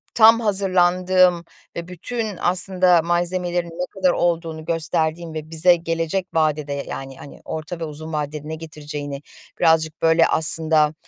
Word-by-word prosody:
tam 225 0 +7
hazırlandığım 185 -3 +2 0.3
ve 170 0 -5
bütün 205 +3 -5
aslında 180 -1 +3
malzemelerin 175 +1 -1
ne 170 +2 -4
kadar 185 -2 +2
olduğunu 165 -3 -1
gösterdiğim 160 0 -2
ve 155 0 -6
bize 165 +2 +5
gelecek 165 +2 -2
vadede, 150 -2 0
yani, 135 -1 -7
hani, 140 - -12
orta 160 +2 -6
ve - - -4
uzun 155 +1 -6
vadede 150 0 -4
ne 160 - -4
getireceğini 150 -3 -7 0.4
birazcık, 160 -1 +2
böyle, 165 0 +4
aslında 155 -1 +1
165 Hz, 135 wpm, -21 LUFS, 155-180 Hz, 0.4 s, tam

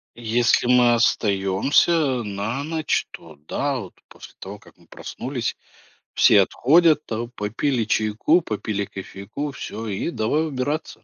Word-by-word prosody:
Если 120 +1 +1
мы 125 -1 +5
остаемся 120 - +2
на 105 +6 -4
ночь, 160 -1 -1
то 80 -2 -13
да. 140 -2 -1
Вот 95 -6 -9
после - - -14
того 100 +2 -9
как - - -20
мы - - -24
проснулись, - - -5 0.6
все 100 - +6
отходят 155 - +3
там, 115 +2 -4
попили 120 +3 -1
чайку, 110 +11 +2
попили 105 -4 -3
кофейку- 100 +10 -7
всё, 115 -4 -7
и 100 - -3
давай 150 +6 0
убираться, 145 +2 -4
120 Hz, 130 wpm, -22 LUFS, 105-145 Hz, 0.6 s, все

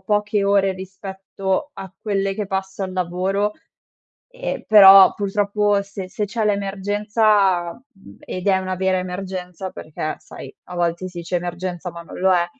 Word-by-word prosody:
poche 210 -1 0
ore 200 -1 +3
rispetto 190 +4 -4
a 190 -1 -9
quelle 195 -2 -1
che 210 -1 -3
passo 195 0 -4
al 185 -1 -4
lavoro." 185 +3 -1 0.8
Ehm, - - -5
però, 195 -2 +9
purtroppo, 205 0 +1
se 195 -1 -7
se 210 - -2
c'è 215 +1 -2
l'emergenza, 200 -2 +1
mhmm, 235 -6 -18
ed 185 +2 -6
è 190 -1 +4
una 185 0 -3
vera 190 0 +1
emergenza 185 0 -5
perché 155 0 -5
sai - - -11
a 180 - -9
volte 175 +1 -1
sì 175 -1 -8
dice 170 +1 -4
emergenza 175 0 -4
ma 170 - -9
non 170 - -11
lo 190 0 +3
è, 175 -1 +3
195 Hz, 155 wpm, -21 LUFS, 185-205 Hz, 0.8 s, però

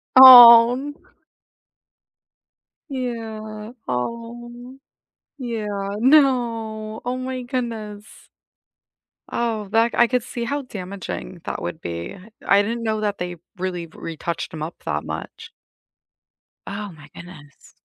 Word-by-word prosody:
Oh, 240 -2 +11
n 285 +3 -6 1.9
Yeah, 225 -4 -6 0.2
oh. 240 - -6 0.6
Yeah, 230 -5 -4 0.3
no, 230 -5 +2
oh 250 +1 -2
my 255 0 -5
goodness. 225 -4 -6 1.0
Oh, 220 -4 -2
that, 230 +1 +3
I 240 - +5
could 250 -1 0
see 240 -1 -5
how 285 +4 -2
damaging 190 -4 -7
that - - -4
would 160 - -5
be. 85 - -6 0.3
I 200 +1 +5
didn't 230 +2 -4
know 220 -1 -1
that 210 -1 -2
they 180 0 -5 0.2
really 180 -2 -4
retouched 165 +1 -6
'em 155 - -6
up 165 +2 -8
that 75 0 -3
much. - - -8 1.2
Oh, 205 -1 -6
my 150 0 -16
goodness. 170 -5 -15
225 Hz, 110 wpm, -22 LUFS, 190-245 Hz, 1.9 s, Oh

